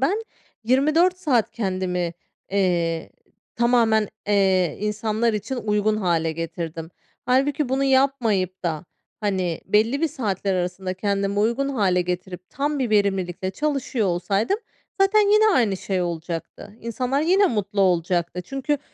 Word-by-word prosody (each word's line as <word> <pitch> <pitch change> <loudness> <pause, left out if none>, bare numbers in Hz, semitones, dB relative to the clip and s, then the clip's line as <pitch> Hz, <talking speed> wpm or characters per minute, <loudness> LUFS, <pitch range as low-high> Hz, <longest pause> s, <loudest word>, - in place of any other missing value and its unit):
Ben 390 +12 +1 0.4
24 310 +9 +3
saat 260 - +1
kendimi, 185 -4 -2 0.4
eee, 175 -4 0 0.5
tamamen, 230 -3 +3 0.2
eee, 190 -4 +2
insanlar 215 +2 0
için 215 +5 -3
uygun 215 -1 +1
hâle 170 -5 0
getirdim. 165 0 -5 0.4
Hâlbuki 270 +2 +2
bunu 265 +1 +1
yapmayıp 245 -9 +1
da, 165 -2 -2 0.4
hani, 185 -5 -1
belli 225 +8 +2
bir 325 - +2
saatler 200 - -2
arasında 185 +1 -2
kendime 200 +1 -1
uygun 235 +6 +1
hâle 200 -9 +1
getirip, 180 0 -5
tam 290 +2 -1
bir 255 -4 -1
verimlilikle 190 -3 0
çalışıyor 265 -1 -1
olsaydım 195 - 0 0.4
zaten 390 +2 +5
yine 430 +1 +5
aynı 220 - +2
şey 185 -1 -2
olacaktı. 170 +4 -5
İnsanlar 250 +4 -1
yine 375 +6 +4
mutlu 205 - -1
olacaktı. 175 -1 +1
Çünkü 275 +5 -2
205 Hz, 125 wpm, -23 LUFS, 180-260 Hz, 0.5 s, zaten